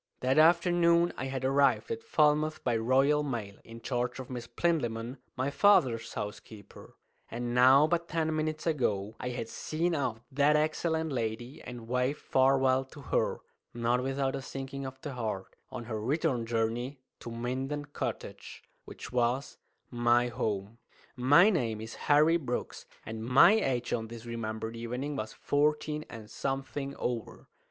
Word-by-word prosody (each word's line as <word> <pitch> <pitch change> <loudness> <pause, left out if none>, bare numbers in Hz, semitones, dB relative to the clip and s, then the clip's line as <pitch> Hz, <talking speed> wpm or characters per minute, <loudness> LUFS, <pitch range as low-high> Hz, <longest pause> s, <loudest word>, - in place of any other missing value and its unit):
That 130 +3 +3
afternoon 170 +1 +4
I 130 - -4
had 130 -1 -3
arrived 140 - +2
at 455 0 -3
Falmouth 155 - +2
by 120 -2 +1
Royal 135 +6 +3
Mail, 115 -8 -4
in 115 0 -11
charge 125 +1 -2
of 130 0 -8
Miss 120 -2 -5
Plinlimmon, 120 -4 -1 0.2
my 130 +2 -1
father's 130 - +3
housekeeper; 105 0 -8 0.3
and 120 +1 -4
now 130 +4 +7
but 170 +1 0
ten 160 -1 -1
minutes 155 0 -2
ago 110 -10 0
I 125 - -3
had 120 -2 -4
seen 165 +8 -2
off 130 -7 -1
that 145 +2 +3
excellent 160 +1 0
lady 120 +1 -3
and 120 -2 -9
waved 125 +3 0
farewell 130 0 +3
to 140 +3 -14
her - - +1 0.3
not 120 +1 +1
without 135 +1 -1
a - - -4
sinking 135 0 -6
of 130 0 -9
the 145 - -5
heart 110 -6 -4
on 125 -2 -6
her 110 -2 -4
return 130 -1 0
journey 120 +4 -1 0.2
to - - -8
Minden 130 +5 -3
Cottage, 145 - -6 0.2
which - - -9
was 125 +2 0 0.3
my 120 0 +3
home. 105 -1 -3 0.4
My 145 +11 +6
name 115 - -1
is 110 +1 -7 0.2
Harry 155 +3 +6
Brooks, 125 -7 -5 0.2
and 110 0 -6
my 130 - +7
age 130 - 0
on 115 -2 -2
this 115 0 -10
remembered 110 -1 -4
evening 125 +5 -4
was 110 -5 -4
fourteen 150 +1 0
and 110 -2 -9
something 135 +2 -4
over. 120 -2 -4
130 Hz, 155 wpm, -30 LUFS, 115-150 Hz, 0.4 s, now